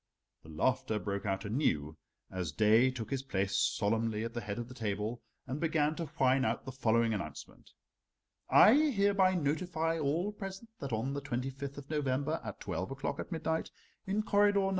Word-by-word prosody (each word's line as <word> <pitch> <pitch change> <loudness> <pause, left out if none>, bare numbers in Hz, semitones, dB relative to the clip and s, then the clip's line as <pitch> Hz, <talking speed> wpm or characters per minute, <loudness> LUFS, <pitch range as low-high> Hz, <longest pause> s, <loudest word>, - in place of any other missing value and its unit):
The 80 - -15
laughter 110 +7 0
broke 100 0 -3
out 95 0 -1
anew 80 - 0 0.4
as 90 -4 -3
Daae 110 - +5
took 115 -4 -6
his 135 -1 0
place 100 -7 -1
solemnly 110 +2 +1
at 115 0 -4
the 120 - -3
head 105 -1 -4
of 120 -1 -4
the 125 - -10
table 110 0 -3 0.2
and 135 +3 -4
began 155 -2 +2
to 165 - -3
whine 130 0 +4
out - - -1
the 130 - -5
following 115 -3 +2
announcement: 105 - -7 0.8
"I 215 - +8
hereby 200 -10 +3
notify 165 +1 0
all 160 +7 0
present 200 +2 -8
that 140 -2 -5
on 115 +5 -1
the 140 - -3
25th 135 +1 -4
of 145 +1 -9
November, 140 -2 0
at - - -7
twelve 95 - -3
o'clock 135 +1 -4
at - - -6
midnight, 160 -1 -1 0.4
in 205 +3 0
corridor 205 -1 +4
No. 195 - +1
130 Hz, 180 wpm, -32 LUFS, 110-160 Hz, 0.8 s, I